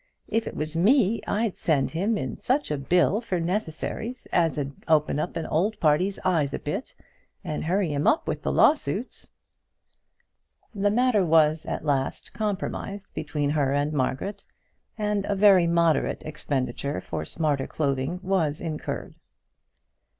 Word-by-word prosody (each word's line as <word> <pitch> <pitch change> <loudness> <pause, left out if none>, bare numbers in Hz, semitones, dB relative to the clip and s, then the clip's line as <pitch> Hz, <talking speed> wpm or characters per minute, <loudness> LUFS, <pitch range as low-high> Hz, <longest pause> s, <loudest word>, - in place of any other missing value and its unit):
If 225 0 -1
it - - -6
was 155 +1 -4
me, 220 - +3
I'd 215 -1 0
send 145 -5 +1
him 200 +7 0
in - - -5
such 270 - 0
a 150 - 0
bill 180 - +2
for 185 -6 -2
necessaries 210 +7 -3
as 165 -3 +2
'ud 140 -1 -2 0.2
open 155 -2 +3
that 165 +1 -2
old 195 +8 +1
party's 170 +5 +2
eyes 160 -7 +1
a - - -2
bit, 195 - -5 0.5
and 155 -5 -3
hurry 180 -2 +1
him 145 +1 0
up 320 - +3
with - - -1
his - - -5
lawsuits." 260 -6 +1 1.4
The 205 -1 +1
matter 235 -2 +3
was 160 -1 +3
at - - -3
last 135 -3 -1
compromised 200 -1 -4
between 145 -1 -2
her 140 -3 +1
and 145 +2 0
Margaret, 150 +9 -2 0.5
and 210 -2 0
a 205 - 0
very 190 -3 +6
moderate 170 -3 +2
expenditure 140 -5 -3
for 80 - -4
smarter 145 - -1
clothing 140 +3 -1
was 170 -6 0
incurred. 155 -3 -4
170 Hz, 145 wpm, -26 LUFS, 150-205 Hz, 1.4 s, very